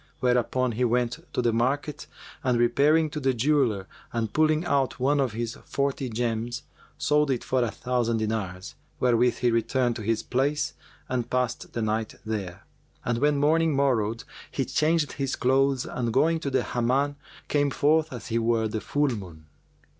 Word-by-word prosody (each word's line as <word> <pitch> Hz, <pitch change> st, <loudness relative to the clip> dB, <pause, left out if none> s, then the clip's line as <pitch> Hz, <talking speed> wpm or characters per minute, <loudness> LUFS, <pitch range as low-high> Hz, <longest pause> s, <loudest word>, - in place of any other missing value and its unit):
Whereupon 125 Hz, 0 st, +1 dB
he 120 Hz, +3 st, -1 dB
went 120 Hz, 0 st, +1 dB
to 125 Hz, -, -1 dB
the 120 Hz, -1 st, +2 dB
market 135 Hz, +6 st, -1 dB, 0.4 s
and 125 Hz, -2 st, +2 dB
repairing 145 Hz, +7 st, +3 dB
to 145 Hz, -3 st, -1 dB
a 130 Hz, -, +1 dB
jeweller 120 Hz, -7 st, +1 dB, 0.2 s
and 115 Hz, -3 st, -2 dB
pulling 155 Hz, +1 st, +2 dB
out 140 Hz, -4 st, +1 dB
one 140 Hz, +3 st, +2 dB
of 130 Hz, -5 st, 0 dB
his 115 Hz, 0 st, -4 dB
forty 140 Hz, -2 st, -1 dB
gems 120 Hz, +1 st, -2 dB, 0.3 s
sold 150 Hz, 0 st, +2 dB
it 130 Hz, -3 st, 0 dB
for 130 Hz, -1 st, +1 dB
a 120 Hz, -, +1 dB
thousand 120 Hz, 0 st, -1 dB
dinars, 105 Hz, -4 st, -3 dB, 0.3 s
wherewith 125 Hz, 0 st, +3 dB
he 120 Hz, -1 st, +2 dB
returned 120 Hz, +1 st, +1 dB
to -, -, -6 dB
his 110 Hz, +1 st, 0 dB
place 140 Hz, +4 st, 0 dB, 0.3 s
and 125 Hz, -2 st, -2 dB
passed 125 Hz, -2 st, -2 dB
the 115 Hz, -, -1 dB
night 110 Hz, 0 st, -1 dB
there; 100 Hz, -5 st, -4 dB, 0.4 s
and 120 Hz, -1 st, 0 dB
when 145 Hz, +1 st, +3 dB
morning 155 Hz, +1 st, +3 dB
morrowed 115 Hz, -5 st, +1 dB, 0.3 s
he -, -, -2 dB
changed 155 Hz, -1 st, +1 dB
his 135 Hz, -2 st, -2 dB
clothes 135 Hz, 0 st, +2 dB
and 120 Hz, -2 st, -2 dB
going 160 Hz, +7 st, +3 dB
to 145 Hz, -, -3 dB
the 130 Hz, -2 st, +1 dB
Hamman 130 Hz, +4 st, 0 dB, 0.3 s
came 145 Hz, -1 st, +2 dB
forth 155 Hz, +3 st, +2 dB
as 125 Hz, -2 st, -7 dB
he 115 Hz, 0 st, +1 dB
were 115 Hz, -1 st, +1 dB
the 110 Hz, 0 st, -3 dB
full 145 Hz, +7 st, +1 dB
moon. 90 Hz, -9 st, -7 dB
125 Hz, 170 wpm, -26 LUFS, 115-140 Hz, 0.4 s, repairing